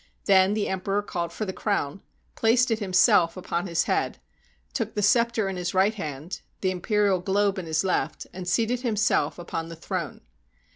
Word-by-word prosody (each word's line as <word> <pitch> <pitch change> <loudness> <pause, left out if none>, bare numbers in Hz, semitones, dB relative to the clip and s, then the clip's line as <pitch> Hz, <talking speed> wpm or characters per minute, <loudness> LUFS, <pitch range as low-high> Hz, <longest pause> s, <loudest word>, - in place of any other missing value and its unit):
Then 195 0 +5
the 215 - 0
emperor 195 +2 -1
called 170 -4 -3
for 215 - -4
the 190 - -4
crown, 195 -5 -2 0.3
placed 235 +2 +3
it 225 - +1
himself 185 -3 +4
upon 175 0 -3
his 165 -2 +1
head, - - -1 0.6
took - - -3
the 210 - 0
scepter 230 0 +3
in 190 -1 -3
his 180 0 -3
right 195 +3 +4
hand, 155 -3 -6 0.2
the 185 - +1
imperial 200 +1 +1
globe 195 +2 +1
in 175 - -6
his 160 +1 +1
left, 190 - -1
and 185 -1 -7
seated 230 +6 +1
himself 225 -2 +1
upon 165 -1 -5
the 165 - -7
throne. 165 - -5
190 Hz, 180 wpm, -26 LUFS, 175-210 Hz, 0.6 s, Then